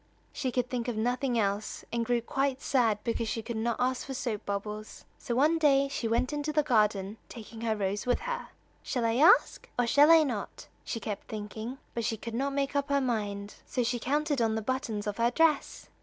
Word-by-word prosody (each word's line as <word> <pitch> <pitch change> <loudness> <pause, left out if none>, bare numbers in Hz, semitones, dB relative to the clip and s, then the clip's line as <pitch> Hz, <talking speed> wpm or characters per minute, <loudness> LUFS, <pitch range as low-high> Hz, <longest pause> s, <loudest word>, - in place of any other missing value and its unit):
She 270 -4 -2
could 250 0 0
think 250 -1 -3
of 240 -3 -2
nothing 245 +2 0
else, 205 -1 -1
and 235 0 +1
grew 240 +1 +1
quite 270 +2 0
sad 240 -7 +2
because 230 -1 -1
she 225 - -3
could 235 +1 -5
not 225 +1 0
ask 255 +1 0
for 270 - -4
soap 235 -5 -3
bubbles. 210 +1 -5
So 235 - -3
one 305 +6 +3
day, 275 -3 +4
she 245 -4 -2
went 235 +5 +1
into 295 +1 -2
the 300 0 +2
garden, 210 -5 +1
taking 225 -1 -10
her 225 -1 0
rose 205 +2 -2
with 245 - +2
her. - - -4 0.3
"Shall 245 -4 -2
I 230 +1 +1
ask? 350 - +5
or 245 - +3
shall 285 +6 +6
I 325 -1 +8
not?" 235 -8 -4 0.2
she 230 - -4
kept 210 -1 -5
thinking, 220 +4 -6 0.2
but 235 - -2
she 225 0 -1
could 230 +1 -7
not 275 +4 -1
make 275 0 -1
up 280 0 0
her 280 0 +3
mind. 205 -5 -2
So 250 - 0
she 240 +1 -1
counted 290 +2 0
on 220 -1 +2
the 220 - -2
buttons 235 -4 -2
of 205 -1 -3
her 235 0 +3
dress. 310 +3 +1
240 Hz, 215 wpm, -29 LUFS, 220-275 Hz, 0.3 s, I